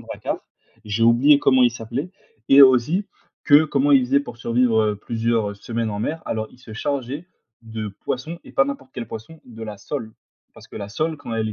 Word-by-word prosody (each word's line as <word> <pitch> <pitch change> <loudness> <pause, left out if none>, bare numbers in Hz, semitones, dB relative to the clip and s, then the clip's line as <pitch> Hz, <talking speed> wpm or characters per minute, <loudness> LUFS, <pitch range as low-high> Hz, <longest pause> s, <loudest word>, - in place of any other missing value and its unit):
Drakkar, - - -4 0.5
j'ai 105 +2 -2
oublié 125 +6 +6
comment 130 -2 +4
il 120 - +5
s'appelait 120 +9 -5 0.4
et 140 +1 +9
aussi, 135 - +4 0.4
que, 150 0 +6
comment 145 -1 +1
ils 135 - +7
faisaient 140 +2 +3
pour 120 -4 -9
survivre, 115 -1 +2
heu, 105 -1 0
plusieurs, 115 0 -1
heu, 100 - -8
semaines 115 +2 -3
en 105 - -4
mer. 160 +8 -3
Alors, 110 -1 -3
ils - - -19
se 115 -3 -12
chargeaient 140 +6 -3 0.4
de 110 -1 -5 0.2
poisson, 155 +7 -4
et - - -13
pas 135 - +4
n'importe 135 -1 -6
quel 120 -3 -6
poisson, 115 +9 -9
de 115 -2 -11
la 105 -2 -7
sole, 115 -1 -5 0.4
parce - - -15
que - - -11
la 100 - -6
sole 155 +9 -2
quand 125 -5 -7
elle 110 -1 -1
est - - -4
120 Hz, 215 wpm, -22 LUFS, 110-140 Hz, 0.5 s, et